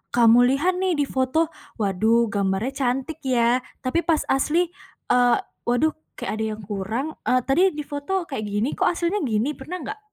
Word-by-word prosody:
kamu 240 Hz, +1 st, +6 dB
lihat 360 Hz, +6 st, 0 dB
nih 375 Hz, -2 st, +1 dB
difoto, 285 Hz, +3 st, 0 dB, 0.2 s
waduh 220 Hz, +2 st, +2 dB
gambarnya 200 Hz, +3 st, 0 dB
cantik 265 Hz, +6 st, -2 dB
ya, 240 Hz, -1 st, +3 dB, 0.2 s
tapi 255 Hz, +6 st, +1 dB
pas 325 Hz, -3 st, +2 dB
asli, 325 Hz, +6 st, +2 dB, 0.4 s
eee, 245 Hz, -1 st, +5 dB, 0.3 s
waduh 245 Hz, +6 st, +3 dB, 0.2 s
kayak -, -, -4 dB
ada -, -, 0 dB
yang 215 Hz, -, -11 dB
kurang, 210 Hz, +8 st, -3 dB, 0.2 s
eee, 255 Hz, 0 st, +3 dB
tadi 275 Hz, +8 st, +2 dB
difoto 300 Hz, +5 st, -3 dB
kayak 220 Hz, -7 st, -3 dB
gini 205 Hz, +6 st, -1 dB
kok -, -, +2 dB
aslinya 350 Hz, +3 st, 0 dB
gini, 225 Hz, +3 st, 0 dB
pernah 300 Hz, +5 st, -7 dB
enggak? 425 Hz, +1 st, -6 dB
260 Hz, 160 wpm, -23 LUFS, 230-315 Hz, 0.4 s, kamu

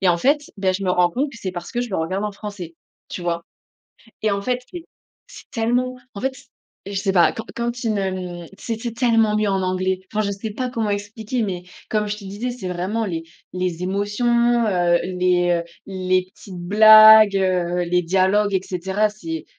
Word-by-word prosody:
Et 190 Hz, -, +2 dB
en 170 Hz, -, +4 dB
fait, 285 Hz, -, +1 dB
beh, 190 Hz, -1 st, +1 dB
je 195 Hz, +1 st, -4 dB
me 185 Hz, -, 0 dB
rends 180 Hz, -1 st, +3 dB
compte 275 Hz, -, -1 dB
que 245 Hz, -, -12 dB
c'est 185 Hz, -3 st, -4 dB
parce 175 Hz, -1 st, -7 dB
que 240 Hz, -, -1 dB
je 240 Hz, -, -6 dB
le -, -, -1 dB
regarde 185 Hz, +6 st, -2 dB
en 210 Hz, -, -3 dB
français, 200 Hz, -5 st, -8 dB, 0.4 s
tu -, -, -5 dB
vois? 170 Hz, -1 st, -2 dB, 0.8 s
Et 215 Hz, -, +2 dB
en 200 Hz, 0 st, -1 dB
fait, 250 Hz, +1 st, -1 dB
c'est 350 Hz, -2 st, -8 dB, 0.4 s
c'est -, -, -14 dB
tellement 245 Hz, +2 st, 0 dB, 0.2 s
en 200 Hz, -, -6 dB
fait, 265 Hz, 0 st, -1 dB, 0.5 s
je 200 Hz, -, -6 dB
sais 195 Hz, 0 st, 0 dB
pas. 175 Hz, -3 st, +5 dB
Quand 225 Hz, -, -6 dB
quand 235 Hz, 0 st, -1 dB
tu 235 Hz, -2 st, -3 dB
ne 195 Hz, -2 st, 0 dB, 0.3 s
mmh -, -, -11 dB
c'était 230 Hz, +1 st, -4 dB
tellement 225 Hz, -3 st, +2 dB
mieux 215 Hz, 0 st, +1 dB
en 195 Hz, -1 st, 0 dB
anglais. 185 Hz, 0 st, -1 dB
Enfin, 215 Hz, 0 st, +1 dB
je 200 Hz, -, -1 dB
sais 200 Hz, +3 st, -5 dB
pas 250 Hz, +4 st, -3 dB
comment 225 Hz, -4 st, -2 dB
expliquer, 215 Hz, +4 st, -3 dB
mais 180 Hz, -3 st, -4 dB, 0.3 s
comme 210 Hz, -1 st, 0 dB
je 210 Hz, -, -3 dB
te 205 Hz, -, -12 dB
disais, 205 Hz, +6 st, -4 dB
c'est 240 Hz, -6 st, -7 dB
vraiment 190 Hz, +6 st, -2 dB
les 165 Hz, -3 st, -3 dB, 0.3 s
les 180 Hz, -1 st, -3 dB
émotions, 235 Hz, +4 st, +1 dB
heu, 175 Hz, -3 st, +2 dB
les, 180 Hz, -1 st, +1 dB
heu, 170 Hz, 0 st, +1 dB, 0.2 s
les 185 Hz, -1 st, 0 dB
petites 185 Hz, -4 st, -11 dB
blagues, 215 Hz, +2 st, +8 dB
heu, 180 Hz, -2 st, 0 dB
les 180 Hz, +1 st, +1 dB
dialogues 190 Hz, +4 st, +2 dB
et 190 Hz, -, +2 dB
cetera. 190 Hz, +4 st, -1 dB
C'est 165 Hz, -6 st, -6 dB
200 Hz, 210 wpm, -21 LUFS, 180-225 Hz, 0.8 s, blagues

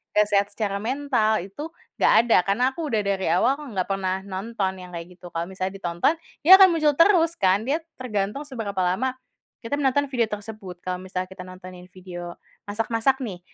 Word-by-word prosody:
gak 210 Hz, 0 st, +4 dB
sehat 200 Hz, 0 st, +3 dB
secara 205 Hz, -1 st, -2 dB
mental 240 Hz, -3 st, +1 dB
itu 200 Hz, -, -7 dB, 0.3 s
enggak -, -, +5 dB
ada 235 Hz, -, +4 dB
karena 200 Hz, +5 st, +1 dB
aku 320 Hz, +2 st, -4 dB
sudah 220 Hz, -2 st, +2 dB
dari 195 Hz, -1 st, 0 dB
awal 230 Hz, +11 st, +3 dB
enggak 210 Hz, -11 st, -3 dB
pernah 190 Hz, -1 st, -1 dB
nonton 195 Hz, 0 st, -3 dB
yang 180 Hz, 0 st, -11 dB
kayak 170 Hz, 0 st, -6 dB
gitu 175 Hz, -, -10 dB
kalau 165 Hz, 0 st, -2 dB
misalnya 190 Hz, 0 st, -4 dB
ditonton 175 Hz, -, +1 dB, 0.3 s
dia 335 Hz, -, +5 dB
akan 385 Hz, -, +10 dB
muncul 305 Hz, -3 st, +3 dB
terus 335 Hz, -2 st, +5 dB
kan 190 Hz, +1 st, +3 dB
dia 295 Hz, +4 st, +1 dB, 0.2 s
tergantung 210 Hz, 0 st, -2 dB
seberapa 220 Hz, -8 st, -4 dB
lama, 230 Hz, +9 st, 0 dB, 0.5 s
kita 230 Hz, +5 st, -2 dB
menonton 280 Hz, 0 st, +1 dB
video 240 Hz, -3 st, +2 dB
tersebut 210 Hz, -4 st, -8 dB
kalau 180 Hz, 0 st, -2 dB
misalnya 185 Hz, 0 st, -4 dB
kita 190 Hz, -1 st, -8 dB
nontonin 185 Hz, -1 st, -11 dB
video, 175 Hz, -2 st, -8 dB, 0.3 s
masak 210 Hz, +2 st, -2 dB
masak 230 Hz, +4 st, +2 dB
nih 195 Hz, -7 st, -5 dB
205 Hz, 185 wpm, -24 LUFS, 185-255 Hz, 0.5 s, akan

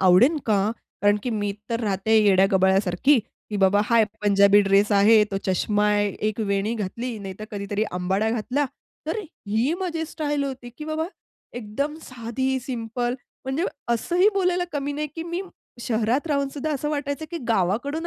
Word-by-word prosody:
आवडेन 190 Hz, -, +5 dB
का? 205 Hz, -1 st, +2 dB, 0.3 s
कारण 205 Hz, 0 st, +5 dB
की 250 Hz, -, -2 dB
मी 205 Hz, -2 st, -1 dB, 0.2 s
तर 230 Hz, 0 st, 0 dB
राहते 210 Hz, 0 st, +1 dB
येड्या 195 Hz, -3 st, +5 dB
गबाळ्यासारखी 190 Hz, +7 st, +3 dB, 0.3 s
की 210 Hz, -, -2 dB
बाबा 195 Hz, +1 st, +4 dB
हा 230 Hz, +1 st, +4 dB, 0.2 s
पंजाबी 200 Hz, 0 st, +5 dB
ड्रेस 200 Hz, +1 st, +3 dB
आहे, 210 Hz, +2 st, +6 dB
तो 205 Hz, -2 st, -4 dB
चष्मा 205 Hz, +2 st, +1 dB
आहे, 205 Hz, 0 st, +2 dB
एक 215 Hz, +1 st, -1 dB
वेणी 200 Hz, +1 st, 0 dB
घातली. 230 Hz, +3 st, -4 dB
नाहीतर 195 Hz, +1 st, -7 dB
कधीतरी 205 Hz, 0 st, -2 dB
अंबाडा 190 Hz, +4 st, 0 dB
घातला. 250 Hz, +5 st, 0 dB, 0.4 s
तर 325 Hz, +8 st, -1 dB, 0.3 s
ही 225 Hz, +8 st, +1 dB
माझी 335 Hz, -4 st, -2 dB
स्टाईल 295 Hz, -2 st, -2 dB
होती 260 Hz, -3 st, -6 dB
की 300 Hz, -, -6 dB
बाबा 315 Hz, +1 st, -2 dB, 0.5 s
एकदम 245 Hz, +6 st, -3 dB
साधी, 255 Hz, +2 st, -2 dB
सिंपल. 240 Hz, -1 st, -3 dB, 0.3 s
म्हणजे 265 Hz, +6 st, -1 dB, 0.3 s
असंही 350 Hz, -, +3 dB
बोलायला 360 Hz, -2 st, +1 dB
कमी 285 Hz, -1 st, -2 dB
नाही 300 Hz, +1 st, -2 dB
की 325 Hz, -, -4 dB
मी 350 Hz, +2 st, -2 dB, 0.4 s
शहरात 235 Hz, +5 st, 0 dB
राहूनसुद्धा, 285 Hz, 0 st, -1 dB
असं 295 Hz, +1 st, -2 dB
वाटायचं 285 Hz, 0 st, -3 dB
की 340 Hz, -, -4 dB
गावाकडून 235 Hz, -, 0 dB
230 Hz, 160 wpm, -24 LUFS, 205-285 Hz, 0.5 s, आहे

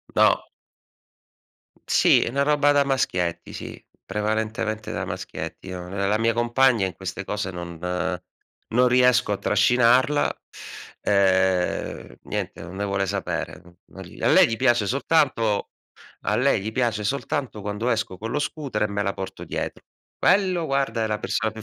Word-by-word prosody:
No. -, -, +4 dB, 1.4 s
Sì, -, -, +4 dB
è -, -, 0 dB
una 140 Hz, +3 st, +1 dB
roba 145 Hz, 0 st, +3 dB
da 145 Hz, -1 st, +4 dB
maschietti, 90 Hz, -10 st, -1 dB
sì, -, -, -8 dB, 0.2 s
prevalentemente 110 Hz, +1 st, -2 dB
da -, -, -2 dB
maschietti. 80 Hz, +4 st, -6 dB
No, 90 Hz, -1 st, -6 dB
ehm, 100 Hz, +1 st, -2 dB
la 105 Hz, +2 st, +2 dB
mia 115 Hz, 0 st, +2 dB
compagna 120 Hz, -2 st, +3 dB
in 95 Hz, -, -4 dB
queste 95 Hz, +1 st, -5 dB
cose 105 Hz, -2 st, -3 dB
non 85 Hz, -1 st, -7 dB, 0.9 s
non 125 Hz, +2 st, +3 dB
riesco 125 Hz, -2 st, +4 dB
a 100 Hz, -, 0 dB
trascinarla. 125 Hz, +4 st, +3 dB, 0.6 s
Ehm, 95 Hz, -9 st, +1 dB
niente, -, -, -4 dB
non 85 Hz, +2 st, -9 dB
ne 100 Hz, -, -2 dB
vuole 100 Hz, 0 st, 0 dB
sapere. 100 Hz, 0 st, -3 dB, 0.3 s
A 95 Hz, -2 st, -5 dB
lei -, -, +6 dB
gli 115 Hz, -, -2 dB
piace 120 Hz, -5 st, +2 dB
soltanto 130 Hz, -6 st, +1 dB, 0.5 s
a -, -, 0 dB
lei -, -, +2 dB
gli 110 Hz, +3 st, -4 dB
piace 115 Hz, -4 st, 0 dB
soltanto 140 Hz, -1 st, -2 dB
quando 105 Hz, +4 st, -3 dB
esco 110 Hz, -6 st, -1 dB
con 115 Hz, +4 st, -5 dB
lo 145 Hz, -, 0 dB
scooter, 145 Hz, -6 st, -3 dB
e 105 Hz, -, +2 dB
me 100 Hz, 0 st, -2 dB
la 100 Hz, 0 st, -1 dB
porto 95 Hz, -, -7 dB
dietro. -, -, -5 dB, 0.3 s
Quello 185 Hz, -4 st, +2 dB
guarda 135 Hz, -5 st, 0 dB
è -, -, 0 dB
la 105 Hz, -1 st, -1 dB
persona 110 Hz, -, -1 dB
più 110 Hz, -, -9 dB
110 Hz, 155 wpm, -24 LUFS, 100-125 Hz, 1.4 s, lei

